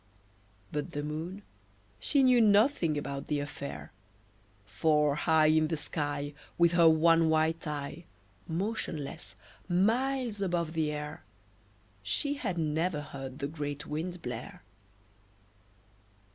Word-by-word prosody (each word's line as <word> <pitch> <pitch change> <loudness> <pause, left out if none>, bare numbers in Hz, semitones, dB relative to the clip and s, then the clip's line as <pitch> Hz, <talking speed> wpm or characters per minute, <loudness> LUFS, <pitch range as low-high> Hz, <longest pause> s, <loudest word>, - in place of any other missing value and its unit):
But 150 -1 -3
the 145 - -3
Moon, 165 +7 -5 0.6
she 280 -2 +2
knew 250 -2 +6
nothing 205 - +4
about 140 -1 -4
the 150 - 0
affair, 75 - -6 0.7
For 150 +7 +2
high 155 +1 +3
In 155 0 +4
the 160 0 -2
sky, 145 -1 -3 0.2
With 170 -1 +5
her 170 -1 +6
one 165 +1 +5
white 160 +1 +1
eye, 150 +3 -5 0.4
Motionless, 165 - -4 0.3
miles 230 +4 +1
above 170 -4 -1
the 160 -2 0
air, 150 0 -6 0.8
She 110 - -1
had 190 -11 -3
never 160 0 0
heard 135 -2 -8
the 140 - -2
great 145 -1 -5
Wind 170 +4 -4
blare. - - -6
160 Hz, 115 wpm, -30 LUFS, 145-175 Hz, 0.8 s, knew